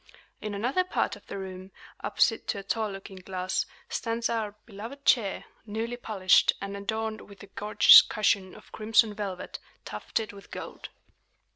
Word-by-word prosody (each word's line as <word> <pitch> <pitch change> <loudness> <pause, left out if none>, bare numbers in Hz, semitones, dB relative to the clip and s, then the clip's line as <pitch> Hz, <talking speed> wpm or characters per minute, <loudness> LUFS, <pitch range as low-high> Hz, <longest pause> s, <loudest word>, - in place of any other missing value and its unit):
In 210 -1 -4
another 250 - +1
part 365 - -1
of - - -18
the - - -6
room, 190 0 -8 0.3
opposite - - +1
to 225 - -1
a 200 - -6
tall 220 +1 -1
looking 195 -1 -9
glass, 185 0 -2 0.2
stands 230 0 -2
our 220 -3 -2
beloved 235 +6 -9
chair, 205 -6 +2 0.2
newly 225 +3 -3
polished, 205 -6 +3
and 200 0 -5
adorned 220 +2 -3
with 200 -1 -14
a - - -11
gorgeous 210 +1 +8
cushion 200 -3 0
of - - -16
crimson 220 0 +3
velvet, 200 -3 -5 0.3
tufted 220 -2 -3
with 200 -1 -13
gold. - - -8
205 Hz, 155 wpm, -28 LUFS, 195-225 Hz, 0.3 s, gorgeous